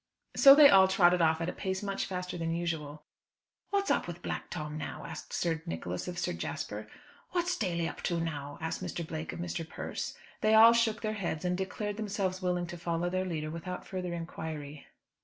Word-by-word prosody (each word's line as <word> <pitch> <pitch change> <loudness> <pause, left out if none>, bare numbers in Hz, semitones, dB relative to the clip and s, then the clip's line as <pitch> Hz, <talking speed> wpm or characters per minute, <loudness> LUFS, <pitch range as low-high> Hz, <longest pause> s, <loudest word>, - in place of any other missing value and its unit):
So 275 -1 +10
they 295 -1 +10
all 190 -5 +7
trotted 180 -2 +4
off 160 0 +3
at 165 - -1
a - - -4
pace 190 0 -3
much 195 -1 -2
faster 180 -1 -4
than 165 -1 -1
usual. 155 -3 -3 0.7
"What's 400 -1 +1
up - - +1
with 175 0 -7
Black - - -4
Tom 150 0 -5
now?" 155 -1 -5
asked - - -8
Sir 165 -2 0
Nicholas 85 +2 -4
of 180 -1 -5
Sir - - -1
Jasper. - - -5 0.5
"What's 355 0 +1
Daly 170 -6 -1
up - - -7
to 170 -2 0
now?" 145 -3 -4
asked 160 +3 -3
Mr. 175 -2 -4
Blake 160 0 -5
of - - -7
Mr. 175 -1 -3
Persse. 160 - -5 0.3
They 215 0 +4
all 225 +1 +9
shook 230 -2 +2
their 215 -1 -1
heads, 180 -5 -3
and 180 0 +1
declared 200 +2 -3
themselves 195 -3 -2
willing 180 -1 0
to 175 0 -8
follow 170 +1 -1
their 185 0 0
leader 155 -4 -3
without 170 +3 -6
further 180 -2 -4
inquiry. 155 -3 -6
175 Hz, 200 wpm, -31 LUFS, 160-195 Hz, 0.7 s, So